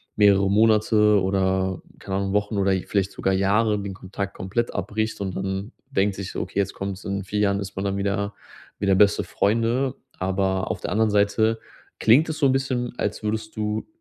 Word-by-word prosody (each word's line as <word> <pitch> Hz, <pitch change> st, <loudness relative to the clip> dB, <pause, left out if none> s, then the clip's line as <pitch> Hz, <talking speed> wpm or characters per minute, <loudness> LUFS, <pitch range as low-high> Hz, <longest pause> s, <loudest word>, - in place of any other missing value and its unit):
mehrere 100 Hz, -2 st, +5 dB
Monate 105 Hz, 0 st, +4 dB
oder 95 Hz, -1 st, 0 dB, 0.2 s
keine 95 Hz, -1 st, -3 dB
Ahnung, 100 Hz, 0 st, -1 dB
Wochen 105 Hz, +1 st, 0 dB
oder 100 Hz, 0 st, +2 dB
vielleicht 100 Hz, -1 st, 0 dB
sogar 95 Hz, -, 0 dB
Jahre 105 Hz, +3 st, +2 dB
den 100 Hz, -1 st, -5 dB
Kontakt 100 Hz, +1 st, -5 dB
komplett 115 Hz, +6 st, -2 dB
abbricht 110 Hz, +1 st, -2 dB
und 95 Hz, -2 st, -3 dB
dann 95 Hz, +3 st, -3 dB, 0.2 s
denkt 100 Hz, -6 st, +1 dB
sich 100 Hz, -1 st, -6 dB
so: -, -, -2 dB
„Okay, -, -, -3 dB
jetzt 100 Hz, -1 st, -1 dB
kommt's“, 95 Hz, -1 st, -5 dB
in 100 Hz, 0 st, -2 dB
4 105 Hz, +2 st, -3 dB
Jahren 100 Hz, -1 st, +2 dB
ist 100 Hz, 0 st, -6 dB
man 95 Hz, -, -3 dB
dann 100 Hz, 0 st, -1 dB
wieder 100 Hz, +1 st, -1 dB, 0.4 s
wieder 100 Hz, -1 st, +2 dB
beste 100 Hz, +1 st, +4 dB
Freunde. 115 Hz, +5 st, 0 dB, 0.2 s
Aber 95 Hz, 0 st, 0 dB
auf 95 Hz, 0 st, -3 dB
der -, -, -4 dB
anderen 110 Hz, +2 st, +2 dB
Seite 110 Hz, +2 st, +2 dB, 0.4 s
klingt 135 Hz, +9 st, +5 dB
es 155 Hz, -, -3 dB
so -, -, +2 dB
'n -, -, +3 dB
bisschen, 130 Hz, -2 st, -1 dB
als -, -, -2 dB
würdest 110 Hz, 0 st, -3 dB
du 105 Hz, 0 st, -2 dB
100 Hz, 195 wpm, -24 LUFS, 95-110 Hz, 0.4 s, mehrere